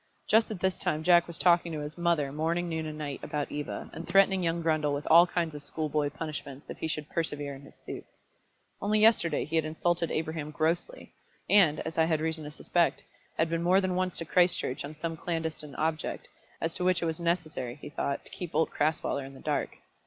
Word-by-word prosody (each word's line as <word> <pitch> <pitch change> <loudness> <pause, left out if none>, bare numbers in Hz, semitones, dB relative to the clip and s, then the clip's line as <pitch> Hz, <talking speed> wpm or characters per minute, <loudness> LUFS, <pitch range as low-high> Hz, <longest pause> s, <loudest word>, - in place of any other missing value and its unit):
Just 220 +1 +4
at 215 -4 -5
this 190 0 +1
time 155 +1 -1
Jack 175 0 +5
was 170 - -5
talking 175 -1 +4
to 155 - -3
his 150 +1 -4
mother, 170 -5 +1
morning, 165 +4 0
noon, 160 -1 -2
and 155 0 -6
night, 145 -3 -4
about 145 -1 -3
Eva, 145 0 -4
and 165 - -7
threatening 195 +1 +4
young 170 0 0
Grundle 155 -3 +1
with 145 - -5
all 170 +2 +9
kinds 170 -3 -1
of 145 - -7
schoolboy 150 0 -1
punishments 145 -2 -7
if - - -9
he - - -2
should 150 -1 -3
persevere 145 -4 -3
in 135 - -10
his 140 - -15
suit. - - -8 0.8
Only 210 +1 +2
yesterday 210 -8 +4
he 160 +2 -1
had 160 - +3
insulted 170 +2 0
Abraham 155 -1 -2
grossly, 165 - -2 0.3
and, 175 -7 +5
as 160 0 -4
I 160 - +5
had 160 -1 +1
reason 160 -1 -2
to 150 - -6
suspect, 170 +3 +1 0.3
had 165 - +3
been 165 0 -1
more 180 +3 +4
than 185 -1 0
once 185 0 0
out - - -3
to 165 - -3
Christchurch 175 -6 +2
on 145 +2 -7
some 165 +1 -4
clandestine 160 -3 -3
object, 155 0 -2 0.3
as 165 0 -1
to 180 - -3
which 180 -1 +2
it - - +1
was 160 0 -2
necessary, 160 -8 -1
he 150 - -9
thought, 140 -1 -2
to - - -7
keep 175 -3 -7
old 160 - +2
Crasweller 150 -2 0
in 135 0 -10
the - - -12
dark. - - -2
160 Hz, 220 wpm, -29 LUFS, 150-175 Hz, 0.8 s, all